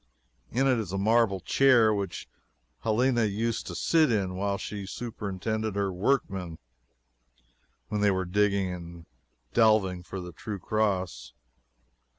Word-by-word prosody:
In 130 +4 +1
it 130 -3 +3
is 100 -5 -4
a 95 - -2
marble 110 -1 +3
chair 115 +2 +4
which 100 -3 -4 0.5
Helena 120 - +2
used 110 +3 -2
to - - -6
sit 160 -5 +3
in 95 -4 0
while 100 +1 -1
she 100 -1 -6
superintended 110 -1 -4
her 100 -2 0
workmen 95 -5 -1 1.3
when 105 -1 -1
they 105 - +4
were 95 -1 0
digging 100 0 +1
and 85 -1 -9 0.5
delving 110 -6 +3
for 95 +2 -7
the 90 -1 -7
True 100 +5 -6
Cross. 100 -2 -1
100 Hz, 135 wpm, -28 LUFS, 95-110 Hz, 1.3 s, chair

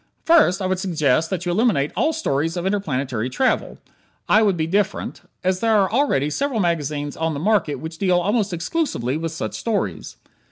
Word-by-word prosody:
First, 250 - +4
I - - -1
would 185 0 0
suggest 160 -4 +1
that 180 -2 -3
you 175 - 0
eliminate 180 - +2
all 315 - +2
stories 165 - -1
of 175 - -3
interplanetary 135 - -1
travel 260 - 0 0.5
(I 215 - +5
would 200 -5 +2
be 160 - 0
different), 195 +3 -1 0.2
as 185 0 +1
there 225 0 +3
are 190 -1 +1
already 215 - +1
several 275 - -1
magazines 150 -5 -1
on 160 -1 -1
the - - -3
market 195 -4 +1
which 160 0 -8
deal 185 -3 +3
almost 205 +3 0
exclusively 170 - -2
with 165 +1 -3
such 165 - -4
stories. 190 - -3
180 Hz, 185 wpm, -22 LUFS, 150-210 Hz, 0.5 s, I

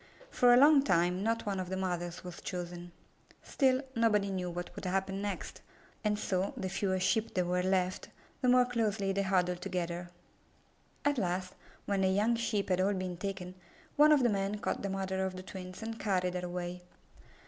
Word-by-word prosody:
For 245 -1 +5
a 245 - +8
long 285 +2 +7
time 180 -7 +2
not 230 +2 0
one 200 -2 -1
of 185 -1 -4
the 190 - -2
mothers 175 -2 -3
was 180 -2 -8
chosen. 175 -1 -6 0.5
Still, 265 -1 +2
nobody 210 -4 +2
knew 180 -2 -2
what 175 0 -6
would - - -7
happen 195 +1 -1
next, 205 -1 -5 0.4
and 210 -1 +1
so, 190 -1 -1
the 190 - -3
fewer 190 0 0
Sheep 220 +4 +1
there 180 -1 +2
were 180 +1 +1
left, 185 0 0 0.3
the 250 - +3
more 250 0 +6
closely 220 -5 0
they 200 - +1
huddled 180 -2 +1
together. 175 -2 -3 1.0
At 290 -3 +2
last, 185 -1 -2 0.3
when 200 -1 0
the 190 - +3
young 210 +5 +2
Sheep 225 -4 -1
had 185 0 +2
all 200 +2 +2
been 185 -1 -3
taken, 185 -1 -5 0.4
one 300 +1 +7
of 290 -4 +5
the 240 - +4
men 200 0 -1
caught - - -2
the 200 - -2
mother 190 0 -2
of 190 -1 -2
the 185 - -7
twins 185 +1 -8
and 225 0 -5
carried 185 -3 0
her 180 0 -3
away. 175 0 -5
190 Hz, 190 wpm, -32 LUFS, 180-210 Hz, 1.0 s, a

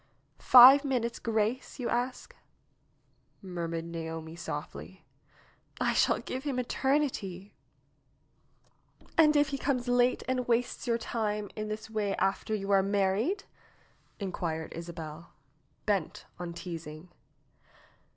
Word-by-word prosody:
"Five 260 +3 +9
minutes' 240 -4 -1
grace, 225 +2 -1
you 250 -3 -3
ask?" 245 +2 -2 1.0
murmured 170 -3 -4
Naomi 165 -1 -6
softly. 175 - -7 0.7
"I - - +1
shall - - +3
give 260 +1 -5
him 280 -4 -2
eternity 245 -8 -1 0.8
!" - - -32
"And 305 -1 +6
if 290 -1 +4
he 275 0 -3
comes 255 -3 -1
late 245 0 +2
and 255 -1 -1
wastes 240 +1 0
your 230 -1 +2
time 210 -3 -3
in 215 0 -4
this 215 +1 -5
way 210 -3 -1
after 195 +2 0
you 200 -1 -3
are 195 -1 +5
married?" 200 - 0 0.8
inquired 170 -5 -4
Isabel, 165 -1 -8 0.5
bent 200 -6 -1
on 175 -1 -5
teasing. 165 -1 -8
210 Hz, 115 wpm, -30 LUFS, 175-250 Hz, 1.0 s, Five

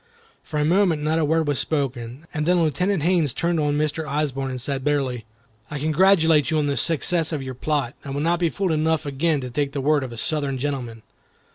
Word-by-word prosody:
For 150 - -4
a 150 - +2
moment 170 -2 +2
not 155 +2 +1
a 160 - +2
word 160 +1 +1
was 145 -2 +1
spoken, 130 -2 -2
and 150 0 -2
then 180 0 +4
Lieutenant 180 +2 0
Haines 165 -6 +2
turned 170 -1 0
on 145 -1 +1
Mr. 155 +1 -1
Osborne 140 -2 -1
and 130 -1 -4
said, 135 +1 -3
bitterly, 135 -5 -1 0.4
"I 150 - -4
congratulate 160 0 +3
you 160 - +1
on 150 - +1
the 140 -1 0
success 165 +4 +1
of 150 -4 -3
your 130 -1 -5
plot. 140 -1 -1
I 140 - -8
will 140 +1 -3
not 170 +2 +1
be 170 -2 +2
fool 190 +1 -1
enough 160 0 +1
again 145 +2 0
to 125 -1 -6
take 140 +2 -1
the 145 - -2
word 145 +1 +2
of 130 - -6
a 115 - -8
Southern 140 0 0
gentleman." 125 -5 -4
150 Hz, 225 wpm, -23 LUFS, 135-160 Hz, 0.4 s, then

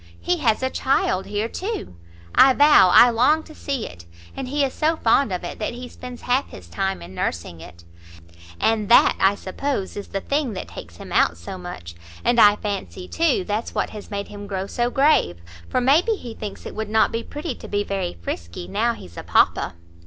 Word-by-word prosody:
He 355 - 0
has 245 -5 +1
a 260 - 0
child 195 -8 0
here, 210 +2 -1
too, 380 - -5 0.4
I 265 0 +7
vow 290 -9 +6
I 240 +6 +8
long 265 +8 +3
to 310 - -13
see 275 -6 -3
it! 85 0 -11 0.3
and 270 - -5
he 285 +2 0
is 270 - -1
so 320 +1 +1
fond 235 -3 +2
of 180 -1 -3
it 175 - -6
that 225 +2 -3
he 250 +1 -7
spends 250 0 -10
half 255 +3 +1
his 90 - -11
time 90 +1 -3
in 85 +2 -11
nursing 85 -2 -4
it; 85 +1 -13 0.8
and 220 -2 +1
that, 235 - +6
I 195 +1 +4
suppose, 200 +2 -3
is 205 - -6
the 195 - -3
thing 280 +2 -1
that 185 - -6
takes - - -10
him - - -10
out 85 - +3
so 85 - -8
much; 90 - -8 0.3
and 240 0 +3
I 205 0 +7
fancy, 200 -3 -5
too, 320 - +1
that's 210 +4 -3
what - - -1
has 210 -2 -9
made 200 -1 -4
him 205 0 -9
grow 190 -1 -3
so 240 +4 -1
grave, 270 - +3 0.3
for - - +1
may 275 +6 +5
be 445 +4 0
he 240 - -8
thinks 210 -3 -8
it - - -7
would 220 -1 -4
not 220 +1 +3
be 230 - -2
pretty 295 +4 -5
to - - -11
be 205 0 -1
very 195 -3 -3
frisky, 85 0 -5
now 230 +3 0
he's 85 - -13
a - - -6
papa." - - +2
220 Hz, 215 wpm, -22 LUFS, 185-265 Hz, 0.8 s, I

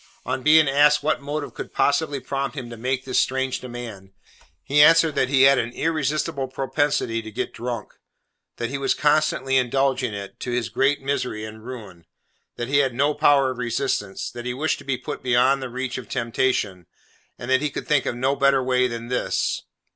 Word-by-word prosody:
On 130 +1 -2
being 155 +2 +6
asked 145 +2 +4
what 155 -1 0
motive 145 +1 -4
could - - -7
possibly 145 0 +1
prompt 135 +1 -4
him 120 -3 -6
to - - -6
make 130 +3 -2
this 130 - +1
strange 130 +1 0
demand, 115 -6 -9 0.5
he 145 +2 +3
answered 165 0 +6
that 130 - +1
he 135 -1 +4
had 135 0 +6
an 115 - -1
irresistible 155 -2 -1
propensity 135 -3 -1
to 110 - -9
get 110 - -4
drunk; 120 -2 -5 0.6
that 120 +1 -3
he 140 - -3
was 135 -1 +1
constantly 145 -2 +2
indulging 130 -2 +1
it, 100 -1 -8
to - - -5
his 120 -1 -1
great 140 +2 +1
misery 125 -6 -2
and 110 0 -10
ruin; 105 -9 -9 0.5
that 120 - -4
he 140 +2 +2
had 135 -4 +1
no 145 +4 +2
power 145 -3 +3
of 125 - -8
resistance; 120 -5 -2
that 120 0 -7
he 125 - -3
wished 155 +4 -1
to - - -12
be 135 -2 -1
put 125 - -6
beyond 130 +2 +3
the 130 - -5
reach 130 +1 -4
of 120 - -11
temptation; 115 -6 -1 0.5
and 120 - -5
that 130 +1 +4
he 150 - 0
could 145 - -6
think 150 -4 +2
of - - -1
no 130 +3 0
better 140 -1 +3
way 125 0 +2
than 115 -1 -6
this. 125 +1 -1
130 Hz, 200 wpm, -23 LUFS, 120-140 Hz, 0.6 s, being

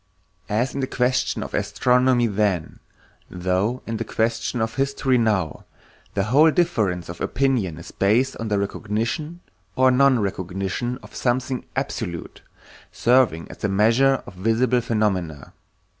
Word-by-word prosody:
As 120 +5 0
in 140 - -4
the 130 - -1
question 125 0 0
of - - -9
astronomy 125 -1 +2
then, 100 -6 -1 0.5
so 95 +7 -1
in 115 -1 -3
the 115 - -2
question 115 +2 -1
of 110 0 -1
history 135 0 +1
now, 105 -9 0 0.5
the 100 - +1
whole 140 +10 +5
difference 110 - 0
of 85 - -8
opinion 125 - 0
is 85 +1 -10
based 120 +7 +2
on 115 - -4
the 105 -1 0
recognition 115 - -3 0.3
or 130 0 +4
nonrecognition 105 -3 0
of - - -14
something 130 +1 -1
absolute, 85 -1 -4 0.5
serving 120 -9 +2
as - - -11
the 100 - -1
measure 115 +7 +3
of - - -10
visible 115 +6 +1
phenomena. 95 -10 -2
115 Hz, 135 wpm, -23 LUFS, 100-130 Hz, 0.5 s, whole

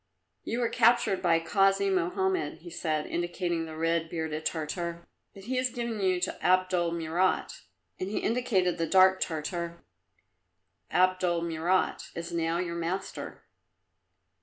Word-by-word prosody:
"You 235 +2 -2
were 235 - +1
captured 235 -4 +3
by 170 -2 +4
Kasi 195 +3 +2
Mohammed," 185 -3 0
he 175 - -9
said, 155 -2 -1
indicating 175 -1 -2
the 160 - -8
red 165 0 0
bearded 160 -2 -2
Tartar, 170 +2 -4 0.3
"but 195 - -11
he 255 +5 -2
has 255 0 +1
given 235 -2 -4
you 185 -2 +2
to - - -3
Abdul 185 -2 +2
Murat." 170 +2 0 0.4
And 185 - -3
he 210 - -3
indicated 195 -8 +1
the 165 - 0
dark 190 +1 +5
Tartar. 170 +1 -3 1.1
"Abdul 180 -2 +2
Murat 170 +3 0
is 170 +1 -5
now 165 0 0
your 170 -1 -2
master." 180 +3 -4
175 Hz, 135 wpm, -29 LUFS, 165-190 Hz, 1.1 s, dark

